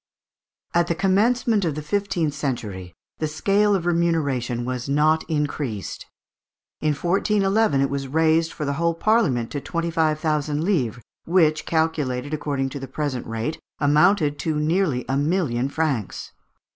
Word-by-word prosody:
At 170 Hz, 0 st, +3 dB
the 170 Hz, -, 0 dB
commencement 210 Hz, +4 st, +2 dB
of 160 Hz, -5 st, -1 dB
the 155 Hz, -, -5 dB
fifteenth 175 Hz, -3 st, -1 dB
century, 105 Hz, -, -4 dB, 0.2 s
the 155 Hz, -, 0 dB
scale 200 Hz, +7 st, +2 dB
of 175 Hz, -3 st, -2 dB
remuneration 145 Hz, -9 st, 0 dB
was 125 Hz, +1 st, -4 dB
not 155 Hz, +3 st, +3 dB
increased. 145 Hz, -, -3 dB, 0.7 s
In 155 Hz, -1 st, +1 dB
1411 195 Hz, 0 st, +2 dB
it 140 Hz, -, +1 dB
was 140 Hz, -1 st, -3 dB
raised 160 Hz, +3 st, +2 dB
for 150 Hz, -, -5 dB
the 140 Hz, -, -1 dB
whole 170 Hz, 0 st, +2 dB
Parliament 165 Hz, -, +1 dB
to 145 Hz, -, -3 dB
twenty 170 Hz, +4 st, -2 dB
five 155 Hz, -2 st, +1 dB
thousand 150 Hz, -1 st, 0 dB
livres, 125 Hz, -, 0 dB, 0.2 s
which, 160 Hz, -3 st, +2 dB
calculated 150 Hz, -4 st, -1 dB
according 140 Hz, -3 st, -1 dB
to 140 Hz, -, -6 dB
the 135 Hz, -, -6 dB
present 135 Hz, -2 st, -3 dB
rate, 115 Hz, +7 st, -3 dB, 0.2 s
amounted 150 Hz, +1 st, +3 dB
to 155 Hz, -2 st, -1 dB
nearly 155 Hz, -4 st, +1 dB
a 135 Hz, -, 0 dB
million 145 Hz, -5 st, 0 dB
francs. 140 Hz, -9 st, -2 dB
155 Hz, 145 wpm, -23 LUFS, 135-170 Hz, 0.7 s, At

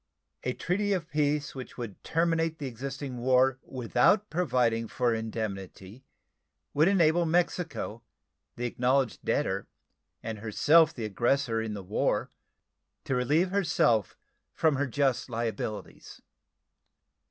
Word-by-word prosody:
A 125 Hz, -, -1 dB
treaty 205 Hz, +7 st, 0 dB
of 170 Hz, -4 st, -3 dB
peace 150 Hz, 0 st, 0 dB
which 130 Hz, -2 st, -9 dB
would 115 Hz, -6 st, -7 dB
terminate 165 Hz, -1 st, +1 dB
the 145 Hz, -, -5 dB
existing 135 Hz, +1 st, -5 dB
war 130 Hz, +1 st, +3 dB
without 130 Hz, -, +1 dB
providing 125 Hz, -9 st, +1 dB
for 120 Hz, +1 st, 0 dB
indemnity 110 Hz, 0 st, -5 dB, 0.7 s
would 155 Hz, +3 st, +4 dB
enable 175 Hz, -3 st, +4 dB
Mexico, 165 Hz, -, -1 dB, 0.5 s
the 120 Hz, -, -3 dB
acknowledged 125 Hz, +1 st, 0 dB
debtor -, -, 0 dB, 0.6 s
and 110 Hz, -2 st, -5 dB
herself 150 Hz, +9 st, +4 dB
the 120 Hz, -8 st, -5 dB
aggressor 120 Hz, +3 st, +1 dB
in 110 Hz, -1 st, -4 dB
the 100 Hz, -, -6 dB
war, 90 Hz, -, 0 dB, 0.7 s
to -, -, -2 dB
relieve 150 Hz, +9 st, +2 dB
herself 155 Hz, -, +2 dB, 0.4 s
from 155 Hz, -4 st, +2 dB
her 145 Hz, +1 st, 0 dB
just 135 Hz, 0 st, 0 dB
liabilities. 115 Hz, -2 st, -5 dB
130 Hz, 120 wpm, -29 LUFS, 115-160 Hz, 0.7 s, would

